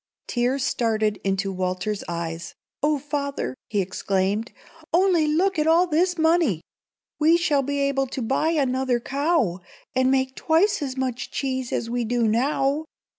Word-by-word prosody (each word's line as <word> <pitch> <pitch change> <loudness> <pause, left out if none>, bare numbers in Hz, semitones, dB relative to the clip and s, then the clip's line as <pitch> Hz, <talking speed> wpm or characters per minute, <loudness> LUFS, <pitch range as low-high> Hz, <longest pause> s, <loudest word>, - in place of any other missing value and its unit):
Tears 250 +2 0
started 220 -4 0
into 195 0 0
Walter's 185 +3 -2
eyes. 170 -1 -5 0.3
"Oh, 300 0 +2
father!" 280 0 -3
he 205 -2 0
exclaimed, 195 +4 -1 0.4
"only 345 -3 +3
look 350 +4 +1
at 305 - +1
all 335 +3 +5
this 355 +2 +1
money! 320 - +2 0.6
We 320 +2 +5
shall 300 -5 +2
be 285 +1 -2
able 275 -1 +1
to 260 - -5
buy 270 +7 +1
another 260 -5 +1
cow, 275 - 0 0.3
and 260 0 +2
make 260 0 +1
twice 335 +4 +2
as 270 -2 -4
much 260 -2 -2
cheese 260 -2 -3
as 230 - -1
we 240 +1 -1
do 235 0 +1
now. 275 +6 +1
265 Hz, 150 wpm, -24 LUFS, 225-305 Hz, 0.6 s, all